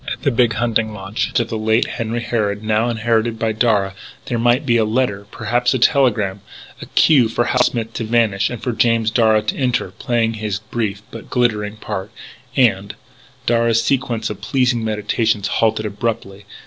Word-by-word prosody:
At - - -6
the 140 - +2
big 120 -1 +2
hunting 110 -1 0
lodge 105 +6 -2
of 115 -1 -2
the 110 -2 -3
late 110 +2 +2
Henry 115 +1 -3
Harrod 105 -3 -1
now 110 +2 +1
inherited 115 0 0
by 115 0 0
Darragh 105 -4 +1 0.3
there 120 - -2
might 120 +5 +2
be 120 -3 +3
a 115 - +3
letter 110 -3 -1
perhaps 120 +3 0
a - - +2
telegram 115 -7 +2 0.4
the - - -9
cue 130 -8 +4
for 120 - 0
Hal 125 +1 +1
Smith 115 -2 -1
to 115 - -3
vanish 110 -3 +1
and 120 -3 -7
for 125 - -1
James 115 -1 +1
Darragh 110 -2 +3
to - - -1
enter, 125 -8 0
play 115 +2 -1
his 105 -3 -3
brief 105 -1 -4
but 115 - -10
glittering 110 -4 0
part, 105 -2 -5 0.5
and 105 -6 +2 0.5
Darragh's 115 -1 +2
sequence 115 -4 -1
of 100 -1 -8
pleasing 120 +1 +1
meditations 105 -1 0
halted 110 0 +1
abruptly.... 105 -2 -4
115 Hz, 175 wpm, -19 LUFS, 105-120 Hz, 0.5 s, cue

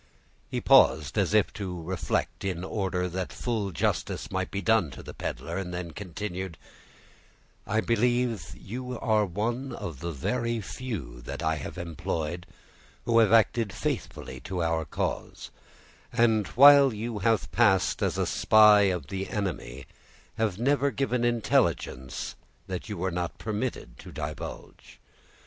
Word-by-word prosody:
He - - -2
paused, 75 -3 +5
as - - +2
if 105 - +3
to 95 -4 -5
reflect 85 +2 -2
in 90 -3 -2
order 95 -2 -1
that 90 +1 -4
full 110 -5 -2
justice 85 - -2
might - - -2
be 100 - -3
done 110 -6 +3
to 65 - -10
the - - -9
peddler, 70 +8 -4
and 90 -2 -5
then 90 -1 -5
continued,— 95 -1 -5 1.1
"I 110 +2 +1
believe 120 -5 0
you 125 +3 -6
are 110 -2 +2
one 115 +9 -2
of 80 -6 -6
the 85 +2 -4
very 115 - -1
few 95 - -6
that - - -5
I 80 0 +1
have 75 - -7
employed 85 0 -4 0.6
who 115 -1 +4
have 110 -2 +4
acted 115 -1 +4
faithfully 135 +5 -4
to 90 -3 -3
our 80 -1 0
cause; - - -4 0.6
and, 110 -3 +3
while 140 +1 +8
you 110 0 -4
have 110 +2 +1
passed 100 -5 +3
as - - 0
a - - +1
spy 105 -1 +6
of 90 -6 -2
the 95 +6 -4
enemy, 85 - -4 0.5
have 110 -4 0
never 140 +4 +2
given 125 -3 -1
intelligence 110 - 0 0.3
that 95 -1 -5
you 105 - -4
were 95 +2 -1
not 85 0 -3
permitted 110 - -4
to - - -10
divulge. 75 0 -7
100 Hz, 145 wpm, -28 LUFS, 85-115 Hz, 1.1 s, while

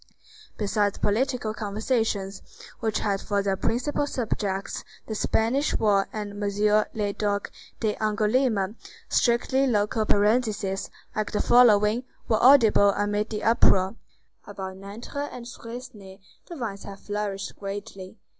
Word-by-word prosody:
Besides 205 -1 0
political 225 0 0
conversations 210 -2 -2 0.4
which 220 -2 -1
had 200 -2 0
for 200 -1 -1
their 195 -1 +1
principal 255 +8 -1
subjects 200 -7 -3 0.2
the 220 - -5
Spanish 230 +6 +1
war 200 -3 +2
and 205 -1 -6
M. 210 +1 +2
le 205 -2 -1
Duc 205 -1 -2 0.3
d'Angoulême, 215 0 +1 0.3
strictly 260 +3 +2
local 215 -1 +1
parentheses, 205 -2 +1 0.3
like 215 -1 -2
the 210 - -1
following, 225 -1 +5 0.2
were 220 -1 +2
audible 230 -6 +6
amid 205 +1 0
the 210 -1 -4
uproar:— 195 -3 +4 0.5
"About 190 -2 -7
Nanterre 225 +9 -6
and 245 -1 -8
Suresnes 230 -5 -10 0.3
the 345 - -8
vines 220 -8 -5
have 200 -1 -9
flourished 205 -1 -4
greatly. 195 0 -7
210 Hz, 120 wpm, -26 LUFS, 200-230 Hz, 0.5 s, audible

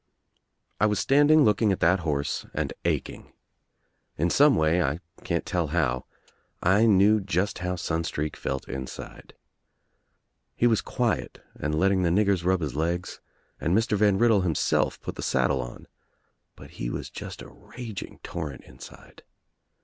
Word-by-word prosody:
I 105 - +4
was 105 -1 0
standing 145 +2 +5
looking 105 -2 +3
at 95 - -1
that 90 +3 +4
horse 75 -4 -2
and - - -2
aching. - - -3 0.8
In 85 +3 +1
some 145 0 +5
way, 80 +3 +2
I 75 -1 0 0.2
can't 85 -1 -1
tell 85 -4 -1
how, 70 -6 0 0.5
I 100 +6 +4
knew 105 +1 +5
just 95 +1 -1
how 90 +1 -2
Sun 85 -2 -2
streak 75 -1 -3
felt 65 - -4
inside. 65 0 -8 1.2
He - - +1
was 115 -4 +3
quiet - - -2
and 75 +1 -3
letting 95 +1 +3
the 85 - +2
niggers 100 0 +2
rub 95 0 +2
his 70 -4 -3
legs 85 +4 -2 0.4
and 85 +4 +1
Mr. 110 -1 +1
Van 105 -1 +3
Riddle 115 -2 +4
himself 85 -5 0
put - - -5
the - - -4
saddle 65 - +1
on, - - -9 0.7
but - - -13
he - - -1
was - - -5
just - - -8
a - - -11
raging 115 -6 -9
torrent 75 -6 -6
inside. 65 - -14
90 Hz, 155 wpm, -26 LUFS, 80-105 Hz, 1.2 s, standing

